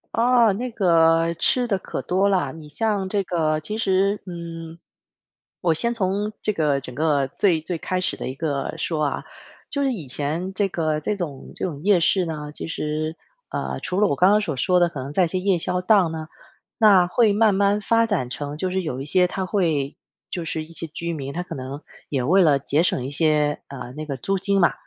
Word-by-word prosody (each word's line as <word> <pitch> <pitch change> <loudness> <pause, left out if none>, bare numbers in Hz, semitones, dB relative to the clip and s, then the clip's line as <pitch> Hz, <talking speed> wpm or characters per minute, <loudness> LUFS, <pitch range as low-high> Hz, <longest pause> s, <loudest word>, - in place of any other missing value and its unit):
哦， 235 -1 +4
那 240 +6 -3
个 165 -4 +3
吃 245 +9 +2
的 200 -4 0
可 - - -5
多 190 +2 +1
了。 180 -9 +1
你 155 0 -11
像 200 +4 -1
这 200 +1 0
个 155 -4 0
其 210 +8 -4
实 195 -1 +1
嗯， 165 -2 -7 0.8
我 170 -3 +3
先 235 +9 +1
从 205 0 -1
这 215 - +1
个 150 -7 +1
整 125 -2 -9
个 145 -2 +1
最 170 0 +2
最 170 +1 -3
开 185 +3 -2
始 - - -1
的 - - -5
一 130 - -5
个 140 -2 -2
说 155 -3 -1
啊， 140 - -2 0.5
就 280 - -1
是 265 -2 +1
以 165 - -7
前 155 +8 -3
这 200 +1 +1
个 155 -4 -1
这 210 +7 -2
种 155 -8 -6
这 - - -3
种 150 -5 -5
夜 190 -2 +4
市 185 +2 +3
呢， 150 -2 -5
其 - - -6
实， 155 0 -3 0.4
呃， - - -3
除 185 +2 -2
了 210 - +5
我 - - +1
刚 185 +3 +5
刚 210 - +4
所 155 -10 -3
说 180 +6 +3
的， 175 - +4
可 145 -5 -6
能 135 +3 -6
在 185 - +3
一 175 - +2
些 185 - -1
夜 190 -1 +2
宵 180 +2 0
档 185 -3 +3
呢 160 -1 -5 0.5
那 200 -5 +6
会 215 +4 +3
慢 210 -1 +3
慢 200 +1 +3
发 230 +2 +3
展 185 - -1
成 145 +3 -5
就 185 +4 -1
是 190 +1 -1
有 135 -6 -4
一 135 - -5
些 180 +4 +3
它 190 +1 -3
会 160 -8 0 0.3
就 175 - -4
是 155 -1 -3
一 165 - -15
些 165 0 -5
居 170 +2 -4
民， 140 -3 -5
他 175 - -2
可 180 - -7
能 135 +3 -6 0.3
也 135 -3 0
为 180 +10 +4
了 145 -4 +4
节 145 +4 +1
省 130 -7 0
一 - - -3
些， 150 -1 +2
呃， 125 -2 -8
那 155 0 -5
个 140 -3 -4
租 195 +8 -1
金 195 +1 +1
嘛。 170 - +4
170 Hz, 240 characters per minute, -23 LUFS, 150-195 Hz, 0.8 s, 那